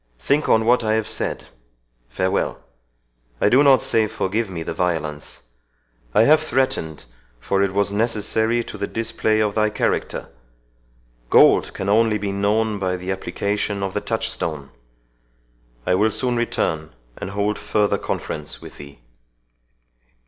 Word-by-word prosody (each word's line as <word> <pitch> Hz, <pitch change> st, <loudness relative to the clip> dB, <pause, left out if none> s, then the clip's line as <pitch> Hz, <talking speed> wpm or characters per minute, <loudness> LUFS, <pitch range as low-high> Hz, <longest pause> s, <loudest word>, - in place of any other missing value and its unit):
Think 145 Hz, -, 0 dB
on 110 Hz, 0 st, +4 dB
what 120 Hz, +1 st, +4 dB
I 110 Hz, 0 st, +1 dB
have 110 Hz, -1 st, -1 dB
said.—Farewell!—I -, -, -5 dB
do 125 Hz, +5 st, +5 dB
not 135 Hz, -4 st, +5 dB
say 110 Hz, -1 st, +2 dB
forgive 105 Hz, +1 st, -2 dB
me 85 Hz, -3 st, -5 dB
the -, -, -4 dB
violence 80 Hz, -5 st, -3 dB, 0.7 s
I 110 Hz, -, +6 dB
have 155 Hz, +5 st, +5 dB
threatened, 130 Hz, -, -1 dB, 0.3 s
for 95 Hz, +10 st, 0 dB
it 100 Hz, -1 st, +1 dB
was 100 Hz, +1 st, +1 dB
necessary 110 Hz, +2 st, 0 dB
to -, -, -9 dB
the 100 Hz, -, -2 dB
display 115 Hz, -1 st, 0 dB
of 105 Hz, -1 st, +1 dB
thy 110 Hz, 0 st, +2 dB
character. 105 Hz, -, -2 dB, 1.0 s
Gold -, -, +5 dB
can 95 Hz, -, -4 dB
be 100 Hz, -, +1 dB
only 105 Hz, -2 st, +2 dB
known 105 Hz, +2 st, 0 dB
by 90 Hz, -1 st, -1 dB
the 90 Hz, +1 st, -4 dB
application 100 Hz, +1 st, -2 dB
of 95 Hz, -1 st, -3 dB
the -, -, -1 dB
touchstone. 75 Hz, -4 st, -3 dB, 1.1 s
I -, -, +2 dB
will 105 Hz, +4 st, +3 dB
soon 125 Hz, +2 st, 0 dB
return, 80 Hz, -, -2 dB, 0.2 s
and -, -, -5 dB
hold 100 Hz, +1 st, -1 dB
further 105 Hz, 0 st, +1 dB
conference 75 Hz, 0 st, -4 dB
with -, -, -12 dB
thee." 70 Hz, -3 st, -12 dB
100 Hz, 140 wpm, -21 LUFS, 80-110 Hz, 1.1 s, I